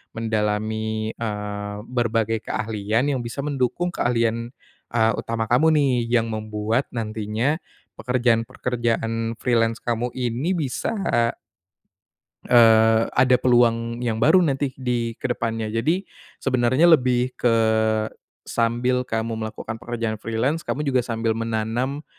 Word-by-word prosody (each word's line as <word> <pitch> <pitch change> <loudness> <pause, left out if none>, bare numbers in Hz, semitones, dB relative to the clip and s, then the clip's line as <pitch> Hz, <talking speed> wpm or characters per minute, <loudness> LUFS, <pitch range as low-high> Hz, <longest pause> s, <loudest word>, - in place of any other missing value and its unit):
mendalami, 110 0 -1
eee, 105 -2 -5
berbagai 115 -2 0
keahlian 110 +5 -1
yang 130 - -1
bisa 120 +4 -5
mendukung 145 +5 -1
keahlian, 115 -4 0 0.4
eee, 115 -1 +2
utama 115 -1 -2
kamu 155 +6 +4
nih 140 -4 +3 0.2
yang 115 -1 +1
membuat 110 +3 -1
nantinya, 110 +6 -1 0.4
pekerjaan-pekerjaan 115 -1 0
freelance 115 -1 0
kamu 120 0 -1
ini 130 +8 -1
bisa 155 - -2 1.5
eee, 115 -1 +5
ada 125 0 +5
peluang 115 -1 +2
yang 115 -2 -1
baru 175 +4 +5
nanti 135 -3 -1
di 120 -3 -2
kedepannya. 115 -2 -2
Jadi, 160 - 0 0.4
sebenarnya 130 +6 +3
lebih 125 -3 +3
ke 115 -2 +3 0.9
sambil 120 +2 0
kamu 115 0 -2
melakukan 110 0 -5
pekerjaan 115 -2 -3
freelance, 125 +9 -1
kamu 150 +1 -3
juga 130 -2 +2
sambil 115 -2 -1
menanam, 115 +5 -2
115 Hz, 110 wpm, -23 LUFS, 110-125 Hz, 1.5 s, eee